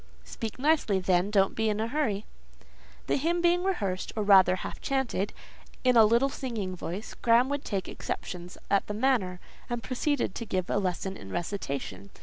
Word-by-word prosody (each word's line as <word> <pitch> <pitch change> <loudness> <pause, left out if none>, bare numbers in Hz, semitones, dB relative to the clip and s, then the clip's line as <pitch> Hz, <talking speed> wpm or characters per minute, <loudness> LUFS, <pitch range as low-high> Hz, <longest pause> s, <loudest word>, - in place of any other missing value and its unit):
"Speak 225 -2 -6
nicely, 285 -7 +2
then: 180 +1 +2
don't 195 -2 +3
be 220 0 +1
in 210 0 -1
a 220 - 0
hurry." 230 -7 -1 0.8
The - - +1
hymn 335 +5 +1
being 350 +1 +3
rehearsed, 200 - -1
or 215 - 0
rather 190 -2 +6
half 185 - -7
chanted, 265 -7 -1 0.5
in 250 -1 +4
a 225 -2 +8
little 235 +5 +4
singing 225 -9 -4
voice, 180 +4 -6
Graham 240 +3 +3
would 285 0 -2
take 195 -3 -3
exceptions 180 0 -6
at 200 - +3
the 210 - -3
manner, 215 -7 +1 0.3
and 240 -1 -3
proceed 280 -3 -1
to 230 - -5
give 185 -2 -2
a - - +2
lesson 190 0 -2
in 95 - -10
recitation. 140 - -4
210 Hz, 175 wpm, -28 LUFS, 185-255 Hz, 0.8 s, a